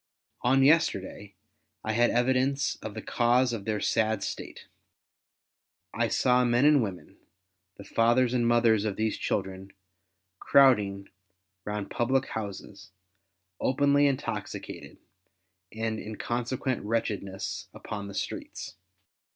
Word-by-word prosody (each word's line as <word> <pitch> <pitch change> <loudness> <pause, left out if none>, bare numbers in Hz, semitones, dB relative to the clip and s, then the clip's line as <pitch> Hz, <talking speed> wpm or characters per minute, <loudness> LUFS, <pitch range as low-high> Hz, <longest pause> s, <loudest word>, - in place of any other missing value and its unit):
On 135 +2 +3
yesterday 105 - +1 0.5
I 110 - -1
had 120 +2 +3
evidence 130 +3 +1
of 110 -1 -8
the 110 - -6
cause 125 +1 +2
of 105 -4 -5
their 110 -1 -1
sad 110 -2 0
state. - - -6 1.3
I - - +1
saw 125 0 +3
men 120 +2 +3
and 150 -2 +6
women, 95 -5 -6 0.6
the 100 - -10
fathers 120 +4 +2
and 120 -2 +2
mothers 115 -3 +3
of 105 -3 -2
these 110 0 -1
children, 95 0 -3 0.7
crowding 105 -8 +3 0.6
round 105 -1 -4
public 130 +2 0
houses, 100 0 -7 0.7
openly 145 +2 +3
intoxicated, 135 -2 -5 0.7
and 110 0 -3
in 110 0 -7
consequent 120 +2 -2
wretchedness 100 -4 -3
upon 100 -2 -7
the 100 - -9
streets. - - -6
115 Hz, 115 wpm, -28 LUFS, 100-125 Hz, 1.3 s, and